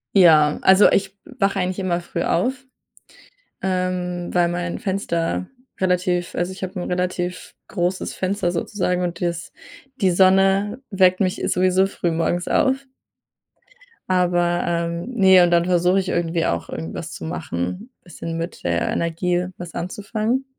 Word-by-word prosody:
Ja, 155 -5 +6
also 190 +2 +6
ich 195 0 0 0.2
wache 195 -1 +1
eigentlich 185 +1 -2
immer 180 -2 0
früh 170 0 -5
auf, 245 +10 +1 1.1
ähm, 180 -1 -2
weil 175 -1 +3
mein 175 0 -3
Fenster 185 -4 -1 0.3
relativ 180 -1 0
also, 175 +1 -1
ich 190 0 -6
habe 185 0 -5
'n - - -5
relativ 180 0 -3
großes 180 0 -2
Fenster 190 -1 -1
sozusagen. 180 +1 -1
Und 175 -1 -3
das 170 -1 -3 0.5
die 190 -3 +3
Sonne 195 +4 +3
weckt 185 -2 +3
mich 185 -1 0
sowieso 185 +1 +3
früh 175 -3 -2
morgens 170 +2 -1
auf. 270 +1 +1 1.2
Aber, 175 -1 +2
ähm 170 0 -2
ne, 190 -5 +6
und 175 - +2
dann 170 0 +3
versuche 180 +1 +3
ich 190 0 -3
irgendwie 165 -1 0
auch - - -1
irgendwas 80 +1 -6
zu - - -8
machen, 135 - -4
bisschen 165 -1 -6
mit 165 +2 -6
der 85 0 0
Energie 175 +2 -1
was 175 -1 -8
anzufangen. 215 +8 -2
180 Hz, 145 wpm, -21 LUFS, 175-190 Hz, 1.2 s, Ja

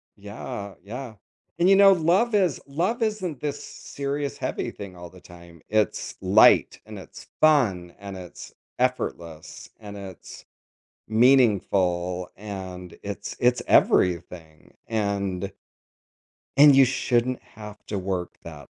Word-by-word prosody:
Yeah, 100 -1 -8
yeah. 120 +3 -7 0.5
And 175 - +4
you 195 - +7
know, 195 0 +7
love 185 +8 +2
is 185 -7 +1
love 185 - -2
isn't 190 - -3
this 145 -1 -4
serious 140 0 -5
heavy - - -3
thing 100 -3 -10
all 85 0 -10
the 90 0 -17
time. 85 -2 -15
It's 110 0 -1
light, - - +5
and - - -10
it's - - -13
fun, 105 - +3
and 100 -1 -8
it's 90 -2 -11 0.3
effortless, 85 -11 -3
and 105 -1 -10
it's 95 -3 -11 0.6
meaningful, 100 -7 +2
and 95 -3 -8
it's - - -6
it's 125 0 +2
everything, 85 -3 +1
and 100 -3 -2 1.0
and 145 0 +8
you 135 -1 +7
shouldn't 125 0 0
have 105 -1 -12
to 105 - -3
work 95 -2 -4
that 75 -4 -11
105 Hz, 125 wpm, -24 LUFS, 90-140 Hz, 1.0 s, and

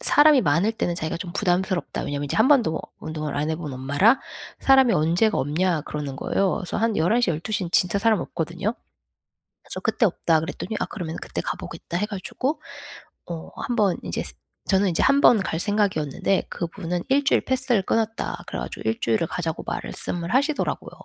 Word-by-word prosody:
사람이 295 - +6
많을 170 +8 +2
때는 175 -6 -1
자기가 160 0 -3
좀 175 +1 -6
부담스럽다. 185 -2 0
왜냐하면 145 0 -3
이제 140 - -3
1 220 - +5
번도 235 - +3 0.2
운동을 155 -2 -4
안 150 +2 0
해 160 - -1
본 155 -3 -6
엄마라 145 - +3 0.4
"사람이 265 -3 +5
언제가 175 +7 +2
없냐." 155 +3 0
그러는 145 -3 -5
거예요. 190 +6 +1
그래서 180 - -4
한 225 -1 +1
11:00 215 +7 +2
12 190 +6 -2
에는 170 - -6
진짜 185 +2 +3
사람 220 0 +3
없거든요. 170 +5 -3 0.9
그래서 - - -7
"그때 - - +1
없다." 165 -3 +2
그랬더니 180 +6 -5
"아 - - 0
그러면은 170 -5 -6
그때 - - -4
가 - - -3
보겠다." 175 - -6
해 210 - 0
가지고 255 +9 -3 0.7
어 165 -1 -6
1 245 -3 -3
번 200 -5 +3
이제 - - -2
스 - - -9 0.3
저는 195 0 +3
이제 170 - 0
1 275 +1 +4
번 235 - +7
갈 175 -4 -2
생각이었는데 195 -4 0
그분은 175 0 -3
1 275 +2 +3
주일 - - +3
패스를 255 -5 +1
끊었다 225 +3 -1
그래 - - -4
가지고 - - -5
1 110 - -3
주일을 115 +8 +1
가자고 165 -2 -3
말씀을 175 +4 -4
하시더라고요. 285 +3 0
185 Hz, 385 characters per minute, -24 LUFS, 160-225 Hz, 0.9 s, 번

